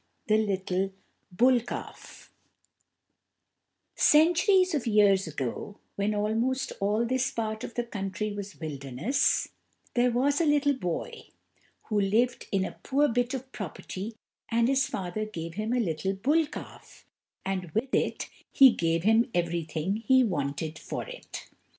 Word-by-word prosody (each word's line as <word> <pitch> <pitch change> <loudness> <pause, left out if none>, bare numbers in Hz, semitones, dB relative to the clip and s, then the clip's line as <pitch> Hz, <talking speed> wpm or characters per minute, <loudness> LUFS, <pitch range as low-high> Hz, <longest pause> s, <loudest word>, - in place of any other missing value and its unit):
The 215 0 +3
Little 190 -2 -1 0.4
Bull 245 +7 +4
Calf 240 - -9 1.6
Centuries 355 +4 +4
of 280 -6 -1
years 205 -4 +4
ago, 150 - -4 0.2
when 205 +1 0
almost 225 +5 0
all 210 +4 +1
this 260 +1 0
part 220 0 -3
of 230 - -7
the 240 - 0
country 205 -2 -4
was 205 -1 -7
wilderness, 145 - 0 0.4
there 245 0 +3
was 275 +5 +2
a - - +3
little 290 -1 +3
boy, 180 -11 -4 0.6
who 210 -2 0
lived 225 +6 +1
in 195 -1 +1
a - - -8
poor 285 +2 +2
bit 245 +2 0
of 260 0 -7
property 200 - -6 0.3
and 230 0 +2
his 270 +1 +2
father 190 +3 -3
gave 170 -6 -6
him 215 +4 -3
a 250 - +2
little 190 -2 -1
bull 290 +11 +2
calf, - - -11 0.4
and 185 -2 -2
with 255 +4 -1
it - - 0 0.2
he 270 -2 +8
gave 165 -4 0
him 225 +4 +4
everything 170 +1 -1
he 260 +4 +4
wanted 155 - -2
for - - -5
it. - - -9
215 Hz, 140 wpm, -28 LUFS, 190-255 Hz, 1.6 s, he